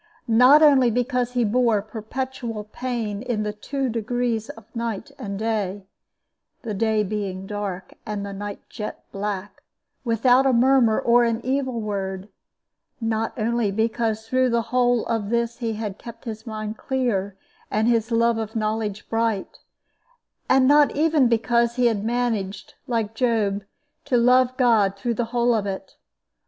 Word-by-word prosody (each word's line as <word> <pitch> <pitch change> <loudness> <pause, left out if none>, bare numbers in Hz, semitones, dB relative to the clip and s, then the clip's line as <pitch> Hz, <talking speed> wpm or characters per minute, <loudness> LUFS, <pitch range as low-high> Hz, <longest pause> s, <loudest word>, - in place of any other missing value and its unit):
Not 250 +7 +7
only 270 -5 +6
because 245 +1 0
he 245 -1 +2
bore 225 -2 +2
perpetual 225 +1 -5
pain 220 -2 -4
in 235 -4 -2
the 210 0 -3
two 270 +6 -3
degrees 235 0 -1
of 225 -8 -10
night 230 -2 -4
and 200 -1 -5
day 205 -3 -2 0.8
the 225 -3 -3
day 220 +1 +1
being 195 -2 -4
dark 195 -3 -5
and 205 -1 -4
the 200 - -6
night 205 +1 -7
jet 210 -2 -7
black 200 0 -4 0.4
without 245 +3 +3
a 265 - +3
murmur 245 -2 +4
or 240 +1 +4
an 230 -1 +1
evil 260 -2 -1
word; 195 -2 -4 0.7
not 225 -1 -2
only 230 -1 0
because 220 +1 -1
through 255 +2 +2
the 235 -1 +1
whole 245 -2 +3
of 220 -3 -2
this 235 0 -1
he 230 -2 -2
had 210 -2 -5
kept 235 -1 -11
his 220 0 -7
mind 215 0 -5
clear 210 -8 -1 0.3
and 215 +2 +1
his 230 -2 +2
love 230 0 +2
of 220 0 -5
knowledge 215 -1 -2
bright; 225 -3 -1 0.9
not 280 +3 +5
even 305 -3 +3
because 235 0 +2
he 250 -1 +2
had 220 -4 +2
managed, 220 -4 -2
like 225 -3 -1
Job, 220 -5 0 0.4
to 250 - +2
love 250 +1 +4
God 220 -6 +3
through 235 +4 -1
the 235 +1 -1
whole 240 +1 +1
of 210 -3 0
it. 190 -1 -6
225 Hz, 150 wpm, -23 LUFS, 210-245 Hz, 0.9 s, Not